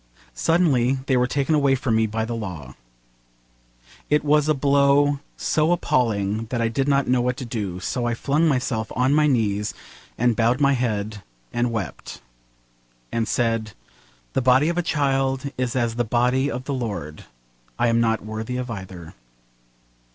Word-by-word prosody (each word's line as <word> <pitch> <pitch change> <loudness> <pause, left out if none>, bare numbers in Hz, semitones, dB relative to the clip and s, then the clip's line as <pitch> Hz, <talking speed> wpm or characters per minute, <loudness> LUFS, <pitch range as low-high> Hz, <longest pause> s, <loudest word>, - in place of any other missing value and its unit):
Suddenly 135 - +2
they 130 - +1
were 125 0 +2
taken 140 +3 0
away 140 -3 +3
from 130 -4 -1
me 110 0 +2
by 110 +1 -2
the 120 - -4
law. 90 - -6 1.4
It 150 0 +2
was 150 +1 +3
a 155 - +3
blow 140 +1 +3 0.2
so 155 +2 +1
appalling 110 - 0
that 120 +2 -3
I 115 -1 +1
did 135 +4 -1
not 140 -1 +2
know 125 0 +2
what 125 +1 -1
to 130 - -5
do, 105 -6 -4
so 120 +6 -2
I 120 - 0
flung 145 +7 +1
myself 125 -6 -1
on 130 +3 +2
my 150 0 +4
knees, 105 -6 0 0.4
and 120 0 +2
bowed 120 +2 +2
my 140 -1 +4
head, 110 -4 -2 0.3
and 120 0 +1
wept, 110 -4 -5 0.9
and 115 -1 -1
said, 115 -1 0 0.6
'The - - +1
body 130 +5 +4
of 170 - -2
a - - +3
child 135 -4 0
is 125 -1 -2
as 120 -3 0
the 120 +1 0
body 125 +4 +1
of 125 -2 -4
the 140 - -3
Lord: 100 - -5 0.5
I - - +2
am 115 0 +2
not 110 -2 0
worthy 110 +3 -4
of 125 -1 -4
either.' 95 -5 -8
125 Hz, 170 wpm, -23 LUFS, 110-140 Hz, 1.4 s, my